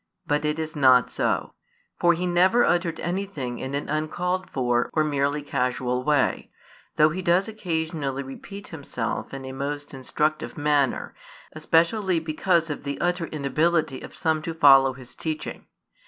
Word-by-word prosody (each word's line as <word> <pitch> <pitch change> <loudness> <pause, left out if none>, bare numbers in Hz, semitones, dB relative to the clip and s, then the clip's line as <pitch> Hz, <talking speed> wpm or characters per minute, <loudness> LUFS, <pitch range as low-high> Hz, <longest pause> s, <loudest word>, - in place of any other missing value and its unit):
But 150 +1 0
it 150 +1 0
is 160 0 -4
not 130 -3 +5
so. - - -1 0.5
For 175 0 +5
He 175 +2 -2
never 185 +7 +4
uttered 170 -2 0
anything 175 -9 -3
in 135 +1 -4
an 145 - -3
uncalled 180 +5 -2
for, 120 -2 0
or 155 - +3
merely 145 0 0
casual 125 -2 -1
way; 150 -1 +1 0.5
though 155 +1 +5
He 185 +4 -3
does 180 +2 +2
occasionally 160 -9 -3
repeat 195 +9 -10
Himself 140 -7 -4
in 135 -1 -7
a 130 - -6
most 145 +2 -5
instructive 150 +4 -2
manner, 145 -3 +1 0.4
especially 170 +5 +2
because 165 +1 +1
of 145 - -6
the 140 -1 -4
utter 175 -1 0
inability 155 0 0
of - - -10
some 160 -2 0
to 165 +1 -5
follow 135 -4 +6
His 130 -1 -13
teaching. 155 -1 -5
155 Hz, 155 wpm, -25 LUFS, 140-170 Hz, 0.5 s, follow